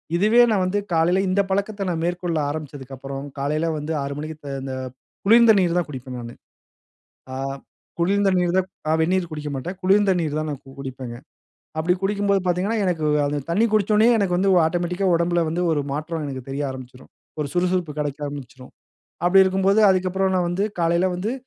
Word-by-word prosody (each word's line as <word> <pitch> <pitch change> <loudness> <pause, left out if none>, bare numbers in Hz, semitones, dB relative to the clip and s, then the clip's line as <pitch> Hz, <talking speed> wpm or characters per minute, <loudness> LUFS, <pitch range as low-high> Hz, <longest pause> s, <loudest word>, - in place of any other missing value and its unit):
இதுவே 215 +7 +5
நான் 200 -3 +2
வந்து 190 +3 0
காலையில 170 +3 +3
இந்த 190 +2 +3
பழக்கத்த 200 -1 -1
மேற்கொள்ள 175 -1 -2
ஆரம்பிச்சத்துக்கப்புறம், 140 -2 -6
காலையில 150 +4 0
வந்து 150 +2 -5
6 140 0 -4
மணிக்கு 155 +1 -6
த - - -5
இந்த 135 -1 -5 0.5
குளிர்ந்த 230 +2 +7
நீர் 175 -2 +1
தான் 175 - 0
குடிப்பேன் 130 -2 -7
நானு. 120 0 -8 1.0
ஆ, - - -4 0.6
குளிர்ந்த 195 +3 +2
நீர் 175 0 +1
தான் 190 -1 +2 0.2
அ - - +3
வெந்நீர் 175 +1 0
குடிக்க 150 -1 -5
மாட்டேன். 175 +8 -5
குளிர்ந்த 195 +2 +4
நீர் 155 -2 -2
தான் 155 - -3
நா - - -2 0.3
குடிப்பேங்க. 130 -3 -6 0.6
அப்படி 165 +3 +2
குடிக்கும்போது 200 0 +1
பாத்தீங்கனா 180 +5 0
எனக்கு 175 -4 0 0.5
தண்ணீ 210 +7 +3
குடிச்சோனயே 215 +2 +4
எனக்கு 195 -4 +1
வந்து 190 +2 +2 0.2
ஆட்டோமேட்டிக்கா 175 +3 -1
உடம்பில 170 0 +2
வந்து 165 +3 -2
ஒரு 150 - +1
மாற்றம் 155 +2 -3
எனக்கு 135 -2 -5
தெரிய 135 +2 -3
ஆரம்பிச்சுரும். 130 -1 -11 0.3
ஒரு 150 - -1
சுறுசுறுப்பு 180 -2 0
கெடைக்க 145 -1 -2
ஆரம்பிச்சுரும். 135 -2 -9 0.5
அப்படி 190 +2 +6
இருக்கும்போது 195 +2 +2
அதுக்கப்புறம் 190 +1 +1
நான் 180 -1 +1
வந்து 180 +3 0 0.2
காலையில 170 +2 +2
வந்து 205 +6 -2
175 Hz, 165 wpm, -22 LUFS, 150-190 Hz, 1.0 s, குளிர்ந்த